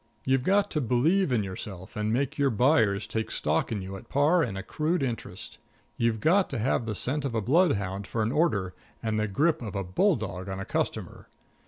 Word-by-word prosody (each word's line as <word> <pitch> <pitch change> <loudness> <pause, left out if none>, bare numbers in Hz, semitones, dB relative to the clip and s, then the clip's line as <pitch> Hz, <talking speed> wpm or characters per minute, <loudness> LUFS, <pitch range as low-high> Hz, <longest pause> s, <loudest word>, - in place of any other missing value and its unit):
You've 130 0 +3
got 200 +8 +2
to 150 - 0
believe 140 - +2
in 115 -4 +2
yourself 95 -1 -7
and 105 0 -1
make 140 +5 -1
your 140 -1 +4
buyers 115 -4 +3
take 110 0 -3
stock 75 +7 0
in 105 -4 -2
you 95 +1 -6
at - - -14
par 150 +5 +3
and 110 -10 -2
accrued 155 - -1
interest. 120 -4 -4 0.4
You've 115 -1 +1
got 180 - +3
to 135 - -3
have 115 0 0
the 110 - -2
scent 140 +8 -1
of 135 -4 -2
a - - +2
bloodhound 100 - +1
for 115 - -1
an 110 - 0
order, 110 - +1 0.3
and 110 -1 0
the 110 - 0
grip 155 - +1
of 105 -3 -6
a 100 - -1
bulldog 100 - 0
on 95 0 -4
a 95 - -4
customer. - - -3
115 Hz, 205 wpm, -27 LUFS, 100-150 Hz, 0.4 s, your